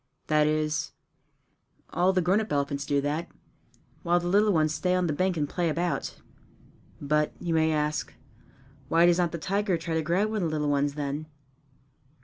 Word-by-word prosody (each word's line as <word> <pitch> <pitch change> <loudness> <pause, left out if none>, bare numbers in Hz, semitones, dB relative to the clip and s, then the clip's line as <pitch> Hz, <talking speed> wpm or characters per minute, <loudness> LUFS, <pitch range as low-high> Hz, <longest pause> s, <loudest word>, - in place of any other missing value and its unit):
That 150 -1 +3
is, 155 0 -1 1.0
all 180 +2 +2
the 185 -2 +1
grown 190 +5 +3
up 220 - -6
elephants 140 0 -1
do 140 -1 +1
that, 150 +4 -2 0.7
while 175 -1 +2
the 175 0 -3
little 205 +3 +4
ones 155 -3 +2
stay 180 +2 0
on 180 -1 +1
the 155 - 0
bank 185 +3 0
and 145 -1 0
play 175 +2 -1
about. 170 +3 -2 0.8
But, 150 +1 0
you 170 - -2
may 160 0 +3
ask, 150 0 -1 0.8
why 165 +1 +4
does 175 0 +4
not 175 -2 +1
the 170 - -4
tiger 195 +2 0
try 165 0 -4
to 160 - +1
grab 180 +7 +1
one 220 - -2
of 170 - 0
the - - -5
little 150 -1 0
ones 145 0 +1
then? 145 +1 -4
160 Hz, 185 wpm, -27 LUFS, 150-180 Hz, 1.0 s, little